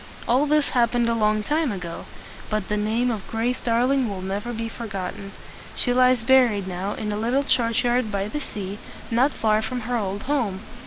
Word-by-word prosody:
All 260 +5 +3
this 300 0 +2
happened 240 -1 +2
a 235 - +2
long 215 -1 +2
time 300 +3 0
ago, 180 -4 -6 0.4
but 215 -2 -2
the 210 - +1
name 220 +4 +1
of 210 -4 -5
Grace 235 +3 -1
Darling 245 +2 +2
will 190 -2 -5
never 200 +5 -3
be 230 -1 -3
forgotten. 195 -4 -6 0.4
She 245 - +1
lies 255 -2 +4
buried 235 -6 +4
now 190 +2 -3
in 210 -1 -3
a 205 - -2
little 240 +6 +1
church 235 -4 +2
yard 240 -2 +1
by 200 0 -1
the 295 +7 -4
sea, 200 -5 -6 0.3
not 250 +5 +3
far 215 -3 +1
from 245 +3 -3
her 245 +2 -2
old 200 -2 -2
home. 245 -9 -1
230 Hz, 195 wpm, -24 LUFS, 205-250 Hz, 0.4 s, lies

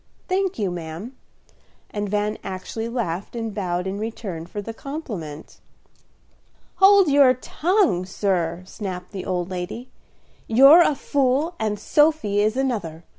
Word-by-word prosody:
"Thank 380 0 0
you, 200 -5 -1
ma'am." 175 +8 -7 0.8
And 205 -1 -3
Van 210 +1 -1
actually 190 +5 -5
laughed 205 -5 -3
and 225 -2 -4
bowed 180 -3 -2
in 190 +1 -3
return 200 -7 -5
for 205 - -6
the 225 +3 -6
compliment. 210 - -7 1.2
"Hold 390 -1 +7
your 280 -3 +5
tongue, 315 - +1
sir," 180 -3 -1
snapped 185 -3 -7
the 195 -3 -6
old 180 0 -2
lady. 185 +8 -6 0.6
"You're 275 +9 +8
a 305 -4 +3
fool 280 +4 0
and 215 -1 -1
Sophy 295 -8 +2
is 215 +4 +1
another. 200 -12 -2
210 Hz, 130 wpm, -23 LUFS, 185-270 Hz, 1.2 s, You're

